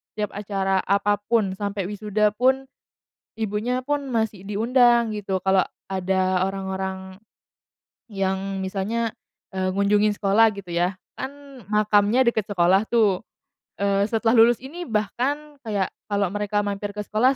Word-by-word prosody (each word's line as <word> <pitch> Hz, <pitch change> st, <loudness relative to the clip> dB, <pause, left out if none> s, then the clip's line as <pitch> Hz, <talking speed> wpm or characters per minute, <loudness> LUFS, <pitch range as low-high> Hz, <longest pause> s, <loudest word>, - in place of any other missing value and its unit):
Setiap 210 Hz, -1 st, -2 dB
acara 195 Hz, -2 st, -1 dB
apa 200 Hz, +1 st, +1 dB
pun, 215 Hz, -5 st, +2 dB
sampai 200 Hz, -1 st, -3 dB
wisuda 210 Hz, +1 st, 0 dB
pun, 260 Hz, +4 st, +2 dB, 0.7 s
ibunya 225 Hz, +4 st, -1 dB
pun 285 Hz, +1 st, -2 dB
masih 220 Hz, -4 st, -1 dB
diundang 235 Hz, +2 st, +3 dB
gitu. 195 Hz, -3 st, -3 dB
Kalau 190 Hz, -1 st, +3 dB, 0.2 s
ada 185 Hz, 0 st, +1 dB
orang-orang, 190 Hz, -1 st, -4 dB, 0.9 s
yang 195 Hz, -1 st, -2 dB
misalnya, 215 Hz, +4 st, -2 dB, 0.4 s
eee, 190 Hz, 0 st, 0 dB
ngunjungin 205 Hz, +2 st, +2 dB
sekolah 215 Hz, +3 st, +4 dB
gitu 190 Hz, -3 st, -8 dB
ya. 175 Hz, +2 st, +1 dB, 0.2 s
Kan 275 Hz, -1 st, -9 dB
makamnya 210 Hz, +3 st, +3 dB
deket 220 Hz, -3 st, +1 dB
sekolah 190 Hz, +2 st, +3 dB
tuh, 210 Hz, -6 st, +3 dB, 0.5 s
eee, 200 Hz, 0 st, +1 dB
setelah 225 Hz, 0 st, +1 dB
lulus 235 Hz, +1 st, +5 dB
ini 340 Hz, +7 st, -7 dB
bahkan 270 Hz, +7 st, -2 dB
kayak, 200 Hz, -4 st, -1 dB, 0.2 s
kalau 200 Hz, -2 st, 0 dB
mereka 205 Hz, 0 st, -1 dB
mampir 205 Hz, 0 st, -3 dB
ke 210 Hz, -, -3 dB
sekolah 240 Hz, +7 st, +2 dB
205 Hz, 130 wpm, -24 LUFS, 195-225 Hz, 0.9 s, lulus